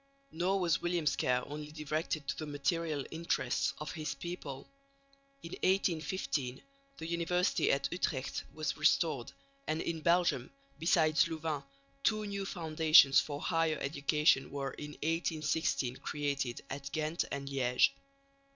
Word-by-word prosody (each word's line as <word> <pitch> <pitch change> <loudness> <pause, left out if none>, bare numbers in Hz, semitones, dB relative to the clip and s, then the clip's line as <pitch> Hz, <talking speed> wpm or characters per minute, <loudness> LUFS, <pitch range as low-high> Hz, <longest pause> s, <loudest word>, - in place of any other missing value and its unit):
Nor 185 +4 +1
was 170 -4 +1
William's 175 -3 +1
care 125 0 +1
only 150 +1 -7
directed 155 -1 -3
to - - 0
the 155 - -3
material 145 +1 -1
interests 165 +1 0
of 150 -2 -5
his 155 -1 -4
people. 145 -6 -6 0.8
In 165 - -8
1815 170 -8 0 0.4
the - - -6
University 170 +2 +1
at 140 0 +1
Utrecht 145 -7 -2
was 155 0 -2
restored; 155 -4 +2 0.4
and 155 - 0
in 165 -1 -3
Belgium, 170 -7 +2 0.3
besides 155 -2 +4
Louvain, 160 -3 -3 0.4
two 215 -1 +2
new 200 -1 -3
foundations 155 -5 +6
for 145 -1 -3
higher 165 -2 +1
education 140 -1 +2
were 140 -1 -3
in 150 0 -8
1816 160 -5 0
created 140 -4 -2
at 140 0 -5
Ghent 155 +3 -1
and 140 0 -4
Liège. 130 -3 +3
155 Hz, 130 wpm, -33 LUFS, 140-170 Hz, 0.8 s, foundations